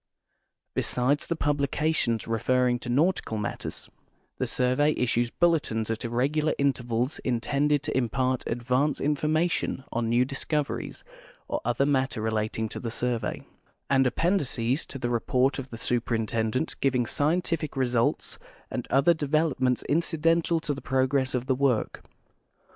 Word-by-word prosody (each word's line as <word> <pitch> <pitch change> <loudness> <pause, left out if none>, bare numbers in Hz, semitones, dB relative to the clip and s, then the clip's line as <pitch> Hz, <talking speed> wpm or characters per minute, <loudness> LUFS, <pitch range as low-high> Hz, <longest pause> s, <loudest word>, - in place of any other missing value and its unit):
Besides 130 +4 +1
the 170 - 0
publications 145 -4 0
referring 125 +2 +1
to 120 - -7
nautical 145 -3 +1
matters, 105 - -4 0.5
the - - 0
survey 130 +4 +2
issues 120 -1 +1
bulletins 145 -10 +1
at 115 +2 -3
irregular 140 +6 0
intervals 125 -1 0
intended 140 +4 +1
to 150 - -2
impart 130 0 0
advance 125 +5 0
information 155 0 0
on 115 -1 -1
new 120 +2 +3
discoveries 145 +2 -3 0.4
or - - -2
other 120 +3 +1
matter 135 -4 +1
relating 110 0 -1
to - - -5
the 115 - -4
survey; 120 -2 -2 0.5
and 135 -1 +4
appendices 135 -4 0
to - - -6
the 120 -2 -2
report 125 +3 +1
of 135 -1 -7
the 115 - -7
Superintendent 115 +2 -1
giving 130 -3 +2
scientific 155 +2 0
results 120 -3 0 0.3
and - - -4
other 140 +6 +4
de 155 -3 -4
velopments 135 -5 +1
incidental 165 +1 +2
to 150 - -1
the 140 - -7
progress 130 0 +1
of 125 0 -1
the 130 - +2
work. 130 -3 0
130 Hz, 135 wpm, -27 LUFS, 120-150 Hz, 0.5 s, and